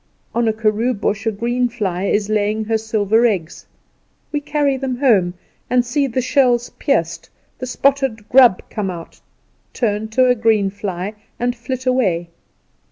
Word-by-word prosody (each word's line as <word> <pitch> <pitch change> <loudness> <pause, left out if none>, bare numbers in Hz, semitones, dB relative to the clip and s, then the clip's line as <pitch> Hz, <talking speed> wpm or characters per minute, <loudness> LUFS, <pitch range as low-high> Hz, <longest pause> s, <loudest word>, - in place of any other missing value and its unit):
On 235 0 +1
a - - +4
karoo 220 +3 0
bush 200 +1 -2
a - - +3
green 240 +4 -1
fly 195 -6 -2
is 205 0 +1
laying 215 0 0
her 225 +1 +1
silver 220 0 +1
eggs. 180 -7 -4 0.6
We 295 -1 -1
carry 290 -2 0
them 260 -1 -3
home, 200 -10 +3 0.3
and 245 0 +2
see 275 +3 0
the 255 0 -1
shells 245 -3 +2
pierced, - - -1 0.3
the 255 - -4
spotted 270 -5 0
grub 245 -7 +5
come 210 -3 -2
out, 170 -2 -9 0.5
turn 220 -2 -1
to 255 +4 +3
a 250 - +5
green 220 -4 +2
fly, 195 -1 -4 0.3
and 245 +1 0
flit 255 +2 -5
away. 190 -10 +1
225 Hz, 160 wpm, -19 LUFS, 205-250 Hz, 0.6 s, grub